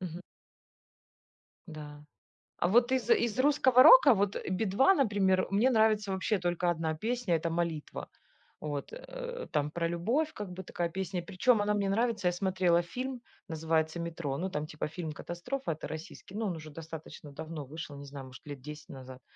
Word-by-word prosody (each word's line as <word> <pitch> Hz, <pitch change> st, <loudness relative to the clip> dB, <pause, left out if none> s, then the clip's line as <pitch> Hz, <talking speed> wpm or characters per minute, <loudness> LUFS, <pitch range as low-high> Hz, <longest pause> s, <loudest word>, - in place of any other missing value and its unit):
Мгм. 175 Hz, -2 st, -6 dB, 1.5 s
Да. 150 Hz, -2 st, -9 dB, 0.5 s
А -, -, +1 dB
вот 240 Hz, +6 st, +4 dB
из 250 Hz, -3 st, 0 dB
из 235 Hz, -1 st, +3 dB
русского 260 Hz, -2 st, +6 dB
рока, -, -, +9 dB
вот 200 Hz, 0 st, 0 dB
"Би-2", 200 Hz, -, +3 dB
например, 200 Hz, -, +2 dB
мне 215 Hz, +6 st, +4 dB
нравится 220 Hz, -4 st, +3 dB
вообще 190 Hz, +2 st, 0 dB
только 175 Hz, 0 st, 0 dB
одна 160 Hz, -2 st, -1 dB
песня 225 Hz, 0 st, 0 dB
это 165 Hz, +1 st, -1 dB
"Молитва". 165 Hz, -2 st, -3 dB, 0.5 s
Вот, 145 Hz, -2 st, -4 dB
э, -, -, -7 dB
там 150 Hz, -2 st, +1 dB
про 170 Hz, +2 st, -1 dB
любовь 235 Hz, -, 0 dB
как 205 Hz, -3 st, -6 dB
бы 185 Hz, +1 st, -7 dB
такая 175 Hz, -1 st, -2 dB
песня. 190 Hz, +1 st, -3 dB
И -, -, -14 dB
причем, 205 Hz, +4 st, +2 dB
она 210 Hz, 0 st, +1 dB
мне 200 Hz, -1 st, 0 dB
нравится. 225 Hz, -1 st, +1 dB
Я -, -, +4 dB
смотрела 180 Hz, -2 st, +2 dB
фильм, 250 Hz, +8 st, -5 dB, 0.3 s
называется 160 Hz, 0 st, 0 dB
"Метро", 165 Hz, -4 st, -3 dB
ну, 190 Hz, +2 st, -2 dB
там 150 Hz, -3 st, -3 dB
типа 150 Hz, 0 st, -4 dB
фильм-катастрофа 175 Hz, -, -4 dB
это 155 Hz, -, -7 dB
российский, 160 Hz, +4 st, -9 dB
ну, 215 Hz, 0 st, -2 dB
он 180 Hz, -, -2 dB
уже 155 Hz, -1 st, -9 dB
достаточно 160 Hz, -1 st, -9 dB
давно 155 Hz, 0 st, -6 dB
вышел, 155 Hz, +1 st, -8 dB
не 140 Hz, 0 st, -9 dB
знаю, 140 Hz, -1 st, -8 dB
может 130 Hz, 0 st, -13 dB
лет 145 Hz, -2 st, -6 dB
10 150 Hz, +3 st, -10 dB
назад. 130 Hz, -2 st, -10 dB
175 Hz, 175 wpm, -31 LUFS, 160-215 Hz, 1.5 s, рока